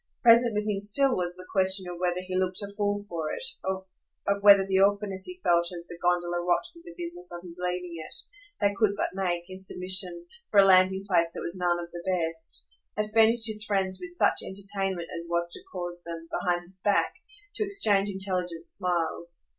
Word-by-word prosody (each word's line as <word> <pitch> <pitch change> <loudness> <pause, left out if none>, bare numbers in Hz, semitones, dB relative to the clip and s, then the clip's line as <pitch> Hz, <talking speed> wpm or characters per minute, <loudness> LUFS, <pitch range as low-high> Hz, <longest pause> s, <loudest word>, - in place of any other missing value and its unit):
Present 235 -1 +6
with 210 0 -1
him 200 -2 -1
still 255 +6 +5
was 175 -1 -2
the 185 0 -11
question 190 -1 +2
of 175 -1 -7
whether 180 0 0
he 185 0 -6
looked 185 0 0
a 200 0 -7
fool 205 -1 -1
for 160 -4 -4
it, - - -3 0.2
of 190 +1 -5
whether 200 -1 +7
the 190 0 +1
awkwardness 200 -1 +1
he 365 0 -8
felt 170 0 +2
as 170 -1 -6
the 170 -1 -10
gondola 175 0 0
rocked 175 0 +1
with 335 0 -17
the 340 - -11
business 350 +1 -3
of 175 0 -7
his 175 -1 -10
leaving 180 -1 -3
it 155 - -7 0.4
they 200 0 +2
could 210 -3 +3
but - - -2
make, 180 -3 -1
in 185 0 -9
submission, 190 - +1 0.2
for 205 - +4
a 195 - +8
landing 190 0 +4
place 170 -3 +2
that - - -6
was 170 - -4
none 175 -1 +1
of 170 0 -7
the 175 - -7
best 165 - -1 0.3
had 210 0 -2
furnished 225 +1 +5
his 215 -1 +4
friends 190 -3 -1
with 180 - -6
such 175 - +1
entertainment 195 -3 -4
as 170 0 -5
was 170 0 0
to - - -5
cause 175 0 -5
them, 165 -1 -8
behind 175 -1 -1
his 185 +2 -16
back, 200 +2 +1 0.4
to - - -1
exchange 210 - +3
intelligent 180 -4 -1
smiles. 170 -1 -2
185 Hz, 205 wpm, -27 LUFS, 175-205 Hz, 0.4 s, a